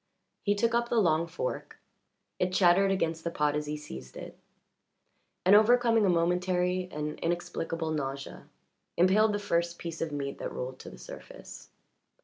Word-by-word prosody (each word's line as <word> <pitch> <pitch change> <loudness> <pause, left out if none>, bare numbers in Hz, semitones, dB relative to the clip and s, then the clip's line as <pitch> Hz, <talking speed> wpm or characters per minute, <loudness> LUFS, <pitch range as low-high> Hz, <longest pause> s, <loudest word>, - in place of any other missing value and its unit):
He 205 -1 +1
took 230 +3 +1
up 235 0 +1
the 235 - +2
long 165 -4 +2
fork - - -5 0.6
it 180 0 +1
chattered 185 +1 +4
against 165 -4 -1
the 170 - -1
pot 150 -3 0
as 150 0 -2
he 150 0 -3
seized 65 - -10
it - - -9 1.1
and, 190 +3 +7
overcoming 230 0 +5
a - - +3
momentary 180 +1 +1
and 150 0 -4
inexplicable 165 -1 -2
nausea, 140 -2 -5 0.5
impaled 200 +5 +4
the 205 - 0
first 170 -4 -1
piece 165 -1 -6
of 165 -2 -2
meat 140 -1 -4
that - - -4
rolled 130 +1 -6
to - - -9
the - - -12
surface. 60 - -11
175 Hz, 160 wpm, -29 LUFS, 150-200 Hz, 1.1 s, and